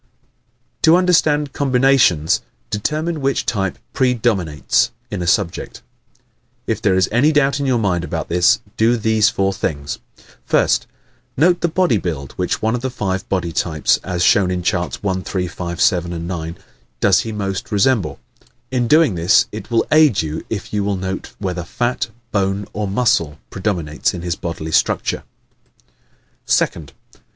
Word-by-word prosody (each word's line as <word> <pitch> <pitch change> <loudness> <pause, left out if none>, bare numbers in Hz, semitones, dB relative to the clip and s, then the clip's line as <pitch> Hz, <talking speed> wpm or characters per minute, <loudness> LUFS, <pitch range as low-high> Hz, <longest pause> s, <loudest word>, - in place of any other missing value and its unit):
_ - - -47
To 160 - +6
Understand 155 -6 +2
Combinations 125 - +3 0.3
Determine 155 +9 -2
which 135 0 0
type 95 -4 -1 0.2
PREDOMINATES 110 - +1 0.2
in - - -3
a 85 - -3
subject. 85 0 -1 0.8
If - - -2
there 95 - +2
is 95 - +3
any 130 +8 +4
doubt 145 -2 +2
in 140 - -1
your 130 -2 +2
mind 95 -6 0
about - - -4
this 90 0 +3 0.2
do 115 +2 +3
these 110 -1 +3
four 95 0 0
things: 70 -6 -3 0.5
1st. - - +2 0.5
Note 175 +5 +3
the 170 - +2
body 170 - +2
build 75 -8 -4
which - - -2
one 110 0 +2
of 120 - -2
the 130 - -2
five 95 -6 -3
body 90 -3 -1
types 80 -1 +1
(as 90 -2 -2
shown 95 -1 +4
in 90 -1 -2
Charts 90 +1 -1
1, 95 -2 -1
3, 90 0 -2
5, 85 0 -6
7, 85 -5 +1
9) 85 -2 -5 0.4
does 95 -1 +4
he 115 - -3
most 100 -2 -4
resemble? 100 - +1 0.5
(In 125 -2 0
doing 155 -4 +4
this 85 +4 +4
it 110 +2 -8
will 115 -1 +2
aid 155 - +5
you 80 0 -4
if 105 -2 -5
you 105 -1 0
will 100 -1 -1
note 95 +1 -5
whether 90 -3 -3
fat, 120 +5 -2 0.2
bone 100 0 0
or 105 0 -2
muscle 95 -8 +1
predominates 90 -6 -1
in 85 - -6
his 85 -1 -1
bodily 80 -2 -5
structure.) - - +1 1.3
2nd. 75 -4 +1
100 Hz, 160 wpm, -19 LUFS, 85-125 Hz, 1.3 s, To